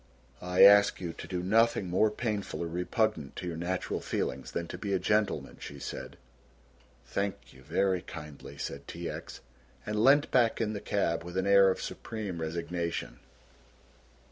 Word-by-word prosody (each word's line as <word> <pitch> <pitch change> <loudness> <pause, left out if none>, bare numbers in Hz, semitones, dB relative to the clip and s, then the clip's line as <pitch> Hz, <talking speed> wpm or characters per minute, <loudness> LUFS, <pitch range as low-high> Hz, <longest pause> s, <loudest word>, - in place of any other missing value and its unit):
"I 90 0 +4
ask 100 0 +7
you 85 -3 -4
to - - -9
do 90 -1 -3
nothing 110 0 +3
more 95 +5 +3
painful 105 -5 -3
or - - -2
repugnant 90 - -1
to - - -6
your 85 - -3
natural 90 +3 -2
feelings 65 +1 -3
than 85 - -3
to - - -6
be 100 0 -2
a - - +4
gentleman," 100 -9 0
she 70 - -8
said. - - -7 0.9
"Thank 100 0 -3
you 65 - -16
very 95 +6 +1
kindly," 70 -3 -9
said 70 0 -6
T. - - -5
X., - - -7 0.4
and 105 +1 0
leant 140 +3 +5
back 120 -3 +3
in 110 -1 0
the 105 - -5
cab 85 -5 0
with 90 +1 -6
an 95 - +1
air 100 -1 +6
of 95 - -1
supreme 100 -7 -5
resignation. 85 -4 -3
95 Hz, 170 wpm, -30 LUFS, 85-105 Hz, 0.9 s, ask